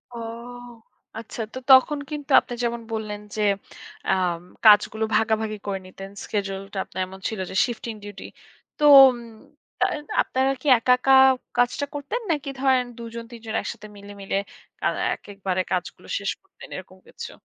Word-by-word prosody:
ও - - -6 1.0
আচ্ছা 230 +1 -7
তো 260 - -5
তখন 265 +3 +6
কিন্তু 295 -2 -6
আপনি 245 - -8
যেমন 235 0 -1
বললেন 215 -2 -4 0.2
যে 215 - -2 0.7
আম 180 -3 +1 0.3
কাজগুলো 215 +1 +6
ভাগাভাগি 220 -1 +1
করে 195 -1 -2
নিতেন, 195 +1 -10 0.2
শিডিউলটা 195 -1 -4
আপনার 185 - -5
এমন 190 +1 -11
ছিল 220 - -6
যে - - -7
শিফটিং 235 -1 -5
ডিউটি। 205 -1 -9 0.5
তো - - -4 0.3
উম 245 - -3 0.6
তাহলে - - +1 0.2
আপনারা 265 +1 0
কি 300 - -6
একা, 230 +2 +1
একা 270 +1 +3 0.4
কাজটা 245 +4 +2
করতেন 290 - -3
নাকি 290 -3 -2
ধরেন 260 -2 +3
দুজন 230 0 -7
তিনজন 225 -2 -8
একসাথে 215 - -7
মিলে, 200 0 -11
মিলে 195 0 -2 0.5
আ - - +5 0.3
একেবারে 195 -2 -3
কাজগুলো 180 -2 -3
শেষ - - -2
করতেন - - -15
এরকম - - -10
কিছু? 470 - -8
220 Hz, 150 wpm, -24 LUFS, 200-260 Hz, 1.0 s, তখন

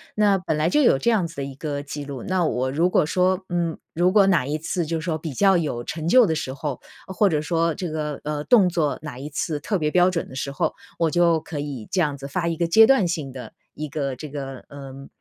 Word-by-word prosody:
那 205 -2 +3
本 180 -4 -2
来 155 +2 +1
就 300 - +3
有 240 - +5
这 235 - +1
样 200 -7 +1
子 165 - -13
的 140 - -4
一 135 0 -6
个 145 0 -4
记 145 0 -6
录， 140 -4 -7
那 185 -1 0
我 130 -3 -1
如 165 +6 +2
果 170 - +3
说， 185 +3 +1
嗯， 170 -2 -1 0.2
如 175 +3 +2
果 200 0 +5
哪 170 -9 +3
一 150 +2 -1
次 165 +2 -2
就 165 +1 -2
是 155 - -7
说 165 -3 -1
比 160 -2 -6
较 195 +5 +4
有 145 -8 -2
成 155 +5 -5
就 245 +7 +6
的 165 - 0
时 130 -3 -3
候， 140 -1 -4 0.3
或 190 +2 +2
者 155 -4 0
说 165 +1 0
这 180 - -4
个， 150 -2 -4
呃， 150 0 -3
动 215 -7 +5
作 165 -4 0
哪 145 -5 -7
一 145 +3 -6
次 150 +1 -2
特 195 +7 -1
别 150 -3 -1
标 180 +2 +4
准 175 -3 -3
的 130 - -11
时 140 +1 -3
候， 140 - -1 0.2
我 165 -2 +1
就 170 -1 +3
可 160 -2 -6
以 140 -7 -5
这 185 - +1
样 145 -3 0
子 140 0 -7
发 170 +4 -2
一 165 - 0
个 170 - 0
阶 220 +6 +7
段 250 -8 +4
性 155 -5 -3
的 125 -4 -9 0.2
一 155 - -4
个 140 -2 -3
这 150 +4 -8
个， 135 -2 -7
呃， 135 -1 -10
155 Hz, 285 characters per minute, -23 LUFS, 140-180 Hz, 0.3 s, 阶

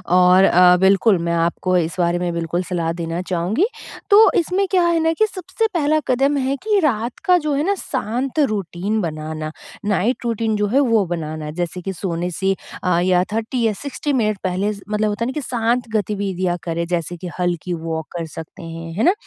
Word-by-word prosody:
और 180 +1 +6
अ, 180 -1 +6
बिल्कुल, 195 +2 +4
मैं 170 0 -1
आपको 170 +2 0
इस 165 -2 -1
बारे 175 0 +2
में 175 -1 -1
बिल्कुल 170 +1 -2
सलाह 170 -2 -2
देना 165 +1 -2
चाहूँगी। 185 - 0 0.4
तो 420 +2 +8
इसमें 365 +4 0
क्या 365 -2 +4
है 335 -1 +2
ना 325 0 +2
कि - - +7
सबसे 430 +3 -2
पहला 310 -2 +2
कदम 275 +3 +2
है 270 +1 0
कि 425 -1 +2
रात 245 - 0
का 360 -2 +6
जो 300 - +1
है 280 +1 +1
ना 400 +2 +2
शांत 260 - -3
रूटीन 210 - 0
बनाना 155 -2 -4 0.3
नाइट 210 +5 0
रूटीन 225 -1 0
जो 210 0 +1
है 250 +7 +2
वो 230 -7 +3
बनाना, 155 -3 -4
जैसे 175 +2 -4
कि 195 +2 -4
सोने 175 -1 -3
से 195 +3 0 0.3
अ, 180 -2 +2
या 180 0 +3
30 225 +3 -1
या 220 - +2
60 285 +1 -3
मिनट 215 -5 +1
पहले 190 +3 0
स 200 - -11
मतलब 210 0 0
होता 210 +3 -2
है - - 0
ना 260 - -2
कि 300 - -2
शांत 240 -1 0
गतिविधियाँ 190 -3 -1
करें 170 0 -2
जैसे 175 -1 -2
कि 180 - -7
हल्की 175 0 -1
वॉक 160 -1 -4
कर 165 - -3
सकते 165 +1 -9
हैं, 165 0 -7
है 205 - -1
ना? 360 - +5
195 Hz, 205 wpm, -20 LUFS, 175-250 Hz, 0.4 s, तो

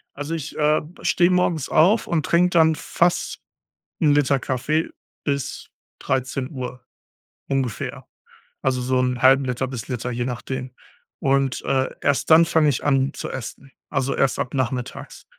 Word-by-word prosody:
Also 145 +3 -4
ich 160 -1 -6
äh, 150 0 +3 0.2
steh 175 0 +3
morgens 180 -5 +1
auf 190 +9 +4
und 160 -3 0
trink 175 +1 +3
dann 160 -2 +4
fast 170 +3 0 0.6
1L 145 -2 +3
Kaffee 140 +5 -1 0.3
bis 140 -2 -3 0.3
13:00 130 -1 -3 0.6
ungefähr. 135 -5 -3 0.6
Also 130 -1 0
so 130 +1 +1
0,5L 130 +1 +2
bis 125 -4 -6
Liter, 125 0 -3
je 120 +1 -2
nachdem. 130 +1 -5 0.5
Und 135 -2 +1
äh, 130 0 +1
erst 145 0 +1
dann 165 +1 +8
fange 160 -2 +3
ich 135 - -1
an 135 0 +2
zu - - -6
essen, 130 +2 -8 0.2
also 135 +1 0
erst 135 - +1
ab 125 - -3
nachmittags 130 -2 -4
135 Hz, 135 wpm, -22 LUFS, 130-155 Hz, 0.6 s, dann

